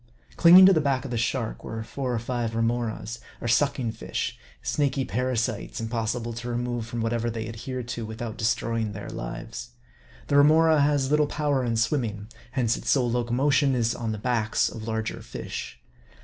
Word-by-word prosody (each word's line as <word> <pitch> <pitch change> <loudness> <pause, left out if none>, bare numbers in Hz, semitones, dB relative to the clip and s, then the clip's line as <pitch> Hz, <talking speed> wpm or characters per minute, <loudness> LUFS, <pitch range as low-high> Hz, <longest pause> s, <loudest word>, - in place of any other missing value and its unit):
Clinging 180 +2 +9
to 195 - +8
the 160 - +3
back 140 -2 0
of 135 - -6
the - - -1
shark, 115 0 -2
were 115 0 -5
four 130 +2 -4
or - - 0
five 115 -1 -2
Remoras, 115 -1 -1 0.2
or - - -4
sucking 120 -1 +2
fish; - - -4 0.3
snaky 135 - 0
parasites, 120 -2 -2
impossible 115 +1 -2
to 115 +2 -6
remove 120 -1 -2
from 120 -1 -4
whatever 115 +1 0
they 110 -1 -4
adhere 120 +3 -5
to, 120 0 -5
without 110 +1 -5
destroying 115 -1 -1
their 105 0 -7
lives. - - -6 0.5
The 145 - +2
Hemora 155 +1 +6
has 140 -1 +2
little 150 0 +4
power 145 -3 0
in 115 -2 0
swimming; 115 -4 -1 0.2
hence 120 -4 +1
its - - -5
sole 125 -4 +3
locomotion 130 +4 +2
is 115 -2 +1
on 115 -2 -3
the 110 - -3
backs 110 -1 +1
of 110 0 -8
larger 110 0 -3
fish. - - -7
120 Hz, 175 wpm, -26 LUFS, 115-135 Hz, 0.5 s, Clinging